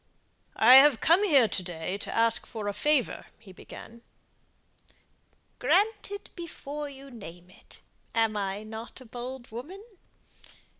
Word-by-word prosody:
"I've 260 +3 +7
come 340 +5 +4
here 280 - +5
to 195 - -1
day 175 0 -5
to - - -5
ask 230 0 +2
a 205 -2 -3
favour," 295 +2 0
he 195 - -15
began. 230 +5 -12 1.6
"Granted 405 0 0
before 300 -4 -7
you 275 0 -12
name 180 -6 -11
it. - - -15 0.3
Am 225 -1 +3
not 215 +4 -5
I - - -12
a - - -17
bold 245 +1 -8
woman?" 330 - -9
240 Hz, 120 wpm, -28 LUFS, 215-295 Hz, 1.6 s, I've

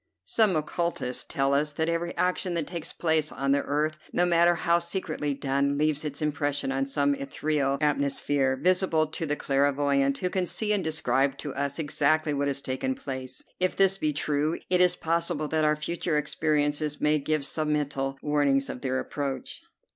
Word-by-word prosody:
Some 215 -5 +3
occultists 155 -4 -2
tell 135 0 0
us 150 +1 +1
that 160 +2 -1
every 170 +1 -2
action 180 0 0
that 165 -3 0
takes 170 -1 -4
place 160 -2 +1
on 135 +1 -1
the 140 0 +3
earth, 155 +2 -1
no 175 - +2
matter 175 0 +4
how 170 0 +2
secretly 170 -5 -3
done, 140 +1 0
leaves 150 0 +1
its 150 0 -4
impression 145 -2 -1
on 135 0 -1
some 140 +1 +1
ethereal 140 0 -1
atmosphere, 140 -2 +1
visible 180 -2 +2
to 155 0 -4
a - - +2
clairvoyant, 140 0 +1
who 180 -1 -2
can 185 -2 0
see 210 +3 0
and 200 -3 0
describe 140 -4 +1
to 145 -2 -5
us 140 0 -2
exactly 155 0 +1
what 140 0 0
has 140 0 -2
taken 130 - -2
place. 130 - -6 0.2
If 185 0 +1
this 195 0 +3
be 155 - +1
true, 150 +1 0
it 180 0 +4
is 180 0 +5
possible 165 -2 -1
that 160 -1 +1
our 150 0 +3
future 155 +1 -2
experiences 150 0 0
may 150 0 +2
give 150 0 -1
sub 155 +1 -2
mental 140 -2 -1
warnings 145 -2 +2
of 125 - -8
their 130 -1 -1
approach. 135 -3 -4
150 Hz, 180 wpm, -27 LUFS, 140-165 Hz, 0.2 s, is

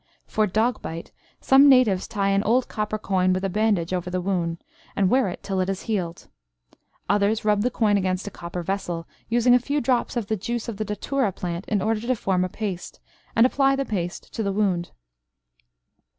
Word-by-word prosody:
For 215 -1 +1
dog 220 +6 0
bite, 165 +1 -7 0.3
some 275 +2 +6
Natives 235 -8 +4
tie 200 -3 0
an 195 0 +3
old 240 +4 +2
copper 215 0 -2
coin 185 -3 +1
with 185 +1 -2
a - - 0
bandage 200 -4 +1
over 180 -1 -2
the 185 0 -1
wound, 175 -3 -1 0.4
and 190 -2 +2
wear 255 -6 +3
it 175 - -8
till 195 -1 -2
it 185 - +1
has 195 -1 -3
healed. 180 -6 -3 0.8
Others 205 +2 +1
rub 210 -1 +3
the 245 - +2
coin 215 -4 +2
against 185 -1 -1
a 205 - -5
copper 175 0 -6
vessel, 175 -3 -3 0.2
using 240 +1 +4
a 250 - +6
few 285 +4 -1
drops 245 -1 0
of 235 - -1
the 220 - -1
juice 235 +4 -4
of 230 -4 -5
the 215 - -2
datura 210 +3 -1
plant 175 0 -5
in 205 -4 0
order 220 0 +1
to 250 +2 0
form 190 -4 0
a 185 - -2
paste, 195 -3 -5 0.4
and 230 - +6
apply 275 +1 +3
the 275 0 -1
paste 180 -6 -4
to - - -3
the 200 -2 0
wound. 190 -4 0
205 Hz, 205 wpm, -24 LUFS, 185-230 Hz, 0.8 s, some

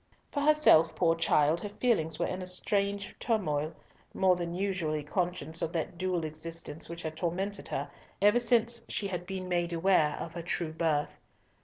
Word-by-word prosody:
For 285 - -1
herself, 295 - +5
poor 165 -2 +3
child, 165 0 +3
her 205 - -4
feelings 200 -9 +1
were - - 0
in 185 +1 -3
a 180 - -6
strange 200 +2 -1
turmoil, 155 -9 -1 0.4
more 185 -1 +4
than 175 -1 -4
usually 180 -6 -1
conscious 175 0 -2
of 165 - -2
that 165 +1 -2
dual 180 -3 0
existence 160 0 -5
which 170 0 -7
had 160 -1 -4
tormented 190 +5 -2
her - - -3 0.3
ever 210 +4 +5
since 235 -1 +2
she 205 - -2
had 180 -2 -4
been 190 -1 -4
made 175 -1 0
aware 165 -3 +3
of 165 - -6
her 170 - -5
true 165 -1 -2
birth. 160 -3 0
175 Hz, 175 wpm, -30 LUFS, 160-195 Hz, 0.4 s, herself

